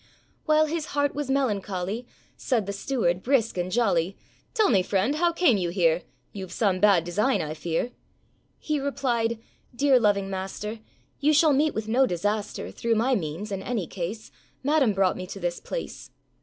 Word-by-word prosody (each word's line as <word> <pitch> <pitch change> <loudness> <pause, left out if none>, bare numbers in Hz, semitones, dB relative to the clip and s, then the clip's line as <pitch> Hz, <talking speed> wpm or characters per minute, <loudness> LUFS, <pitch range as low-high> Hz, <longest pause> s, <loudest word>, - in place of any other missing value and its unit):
While 310 0 +4
his 315 0 -3
heart 285 -1 +2
was 290 -1 -4
melancholy, 210 -4 -1 0.3
Said 235 -6 0
the 200 - -4
steward, 200 -5 0
brisk 240 -2 +1
and 180 0 -2
jolly, 195 -5 +1 0.4
âTell 435 - +4
me, 195 -5 +4
friend, 200 +10 0
how 345 +1 +3
came 335 - +3
you 175 -2 -1
here? 170 -2 +2 0.3
Youâve 190 -2 -6
some 195 -3 +1
bad 200 -5 +5
design, 210 +10 +1
I 155 0 -3
fear.â 165 +9 -2 0.7
He 305 -2 -2
replied, 245 -5 0 0.4
âDear 275 -2 +4
loving 200 -2 +2
master, 195 +3 -5 0.4
You 300 +2 +3
shall 305 0 +5
meet 300 +3 +2
with 220 0 -3
no 255 +4 +3
disaster 205 +3 -2
Through 230 -1 0
my 240 +5 +2
means, 185 +1 -3
in 195 -1 -3
any 225 -4 -2
case,â 195 +6 -6 0.3
Madam 280 -6 +3
brought 190 -1 +2
me 185 - -6
to 195 - -7
this 175 -1 -2
place. - - -6
215 Hz, 170 wpm, -26 LUFS, 185-270 Hz, 0.7 s, bad